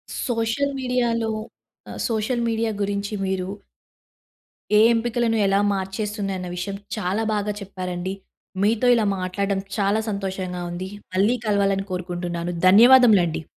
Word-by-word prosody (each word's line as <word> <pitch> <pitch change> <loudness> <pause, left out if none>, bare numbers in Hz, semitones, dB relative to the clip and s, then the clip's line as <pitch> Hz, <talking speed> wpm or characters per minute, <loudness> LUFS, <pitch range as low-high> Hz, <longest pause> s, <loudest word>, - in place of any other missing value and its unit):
Social 240 +4 -1
మీడియాలో 240 -3 0 0.6
ఆహ్, - - -8
social 230 +2 -1
media 225 0 0
గురించి 200 +1 -2
మీరు... 190 -1 -2 1.3
ఏ - - +7
ఎంపికలను 230 0 0
ఎలా 195 0 +3
మార్చేస్తుది 195 +1 -3
అన్న 180 0 -6
విషయం, 180 +3 -4 0.2
చాలా 205 +1 -1
బాగా 210 0 -1
చెప్పారండి. 185 -1 -5 0.5
మీతో 220 +4 +2
ఇలా 225 -2 +1
మాట్లాడడం 195 +2 -1 0.2
చాలా 200 +1 +2
సంతోషంగా 190 -3 -4
ఉంది. 185 +2 -5 0.3
మళ్ళీ 205 +6 +3
కలవాలని 200 -2 +1
కోరుకుంటున్నాను. 175 -1 -3 0.2
ధన్యవాదములండి. 215 -6 +6
200 Hz, 115 wpm, -23 LUFS, 185-225 Hz, 1.3 s, ఏ